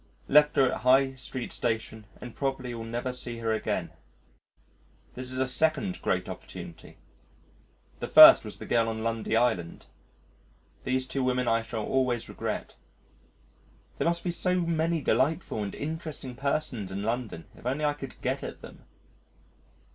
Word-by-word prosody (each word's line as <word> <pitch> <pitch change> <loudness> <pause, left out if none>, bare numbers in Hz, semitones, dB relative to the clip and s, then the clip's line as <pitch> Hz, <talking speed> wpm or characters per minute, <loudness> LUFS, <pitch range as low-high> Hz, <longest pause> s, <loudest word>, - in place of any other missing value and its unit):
Left 150 +1 +5
her 130 -2 +4
at - - -3
High 135 +1 +4
Street 130 -1 -6
Station 110 -2 -3
and 120 -2 -9
probably 135 -3 -2
will 115 -1 -6
never 120 +3 -3
see 120 -2 -5
her 115 -1 -1
again. 110 - -2 1.2
This 130 0 -5
is 130 - -4
a 130 0 +1
second 140 -9 0
great - - 0
opportunity. 80 - -9 1.0
The - - -4
first - - +10
was - - -7
the - - -8
girl 115 -1 +2
on 110 0 -4
Lundy 115 -1 -1
Island. 110 -9 0 1.0
These 130 0 0
two 135 0 -2
women 125 -1 0
I 115 0 +3
shall 115 -1 -4
always 125 -3 0
regret. - - -4 1.3
There - - +1
must 170 0 0
be 180 - -1
so 180 +1 0
many 165 -1 0
delightful 150 -4 +1
and 100 -1 -4
interesting 155 -4 -5
persons 135 -6 -2
in 100 +1 -4
London 115 -6 -3
if - - -8
only 145 +4 0
I 145 - +2
could 135 -3 -9
get - - -1
at - - -8
them. - - -13
125 Hz, 155 wpm, -28 LUFS, 115-140 Hz, 1.3 s, first